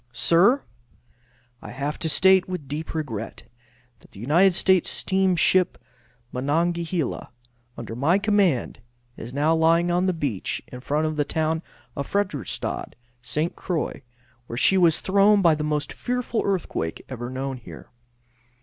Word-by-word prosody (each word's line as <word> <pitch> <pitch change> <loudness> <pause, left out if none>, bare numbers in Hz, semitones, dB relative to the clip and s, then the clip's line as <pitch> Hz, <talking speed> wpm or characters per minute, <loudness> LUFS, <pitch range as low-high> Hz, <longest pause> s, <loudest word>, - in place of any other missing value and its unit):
Sir: 190 - +3 1.0
I - - -9
have 145 +2 -4
to 160 - -2
state, 190 +3 +4
with 180 -7 -5
deep 155 +4 -5
regret, 115 -9 -5 0.6
that - - -19
the 100 - -14
United 170 - +3
States 190 -1 +3
steamship 185 -1 +2 0.5
Monongahela, 165 +3 -1 0.5
under 115 -1 -7
my 150 +9 +2
command, 200 - +1 0.4
is 115 - -8
now 145 +4 +2
lying 165 +2 +3
on 180 +2 +1
the 185 - +1
beach 140 - -3
in 125 - -9
front 150 +4 0
of 155 -1 -2
the 145 - +2
town 160 +2 -1 0.3
of 140 - -5
Frederickstadt, 185 - -3 0.3
St. 150 +6 -1
Croix, 175 -5 -3 0.5
where 115 - -6
she 190 - +4
was 170 -4 +3
thrown 200 +1 +4
by 165 -2 +6
the 150 0 -2
most 150 -1 -2
fearful 250 -2 -2
earthquake 175 - -2
ever 120 -2 -6
known 130 +1 -4
here. 120 - -12
160 Hz, 140 wpm, -24 LUFS, 140-185 Hz, 1.0 s, by